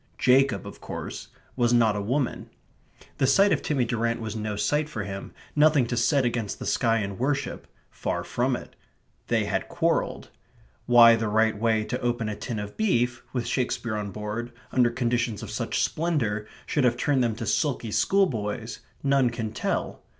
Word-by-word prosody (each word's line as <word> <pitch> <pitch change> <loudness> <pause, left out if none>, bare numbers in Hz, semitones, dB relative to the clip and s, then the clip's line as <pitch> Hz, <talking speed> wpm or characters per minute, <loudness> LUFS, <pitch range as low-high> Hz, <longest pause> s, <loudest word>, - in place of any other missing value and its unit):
Jacob, 125 -4 +3
of - - -10
course, - - -6 0.3
was 120 -2 +2
not 115 -3 +4
a 105 - -2
woman. 125 +6 -2 0.7
The 130 - +3
sight 195 +7 +5
of - - +2
Timmy 135 -5 0
Durrant 115 0 -1
was 110 -1 -5
no 110 -1 -3
sight 150 +9 0
for 110 -8 -4
him, 100 0 -6 0.2
nothing 150 -3 +5
to 120 - -2
set 130 +3 +2
against 115 -4 -2
the - - -7
sky 115 -3 +2
and 100 -3 -3
worship; 140 +2 -2 0.2
far - - -3
from - - 0
it. - - -9 0.5
They - - +1
had - - -2
quarrelled. - - -1 0.6
Why 120 -1 +8
the 115 -1 -2
right 110 +1 +2
way 110 0 +1
to 125 +4 -4
open 120 -2 -1
a 105 - -3
tin 115 +1 -5
of 105 0 -6
beef, 120 - +1
with 125 -3 -2
Shakespeare 120 -3 -1
on 105 -1 -3
board, 105 +4 -5 0.2
under 125 -2 +4
conditions 120 -2 -1
of - - -7
such - - -1
splendour, 120 -11 -1 0.2
should 145 - 0
have 120 -1 +3
turned 135 0 +2
them 115 -2 0
to 115 +1 -5
sulky 130 -7 0
schoolboys, 115 - 0 0.2
none 135 -2 +3
can 115 -2 -4
tell. - - -2
120 Hz, 180 wpm, -26 LUFS, 110-130 Hz, 0.7 s, Why